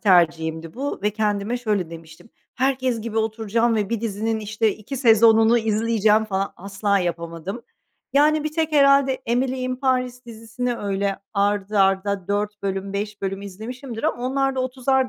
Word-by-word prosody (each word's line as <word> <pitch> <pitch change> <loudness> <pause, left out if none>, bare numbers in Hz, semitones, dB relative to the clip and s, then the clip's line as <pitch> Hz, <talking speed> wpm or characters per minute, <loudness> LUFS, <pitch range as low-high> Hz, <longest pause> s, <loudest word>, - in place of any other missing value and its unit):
tercihimdi 165 -4 +2
bu 280 +3 -4
ve 210 - +2
kendime 210 +2 -1
şöyle 210 -8 -1
demiştim. 165 +5 -12 0.3
Herkes 260 -2 0
gibi 225 0 -3
oturacağım 225 +1 0
ve 205 -2 0
bir 230 -2 -2
dizinin 220 0 -2
işte 215 0 0
2 225 +6 -7
sezonunu 225 -1 +5
izleyeceğim 220 -1 +2
falan, 195 -2 -2
asla 200 +1 0
yapamadım. 170 +4 -4 0.5
Yani, 300 +2 +3
bir 305 - -2
tek 320 -1 -1
herhâlde 275 -2 +5
Emily 255 +2 0
in 255 0 -2
Paris 255 -1 -1
dizisini 230 +2 -4
öyle 200 -1 -1 0.2
art 200 0 0
arda 195 -1 +1
4 205 0 -2
bölüm, 195 0 -3
5 205 0 -4
bölüm 195 0 -3
izlemişimdir. 225 +5 -7
Ama 240 - -1
onlar 270 0 0
da 260 - -1
30'ar 260 0 +1
220 Hz, 155 wpm, -23 LUFS, 200-250 Hz, 0.5 s, sezonunu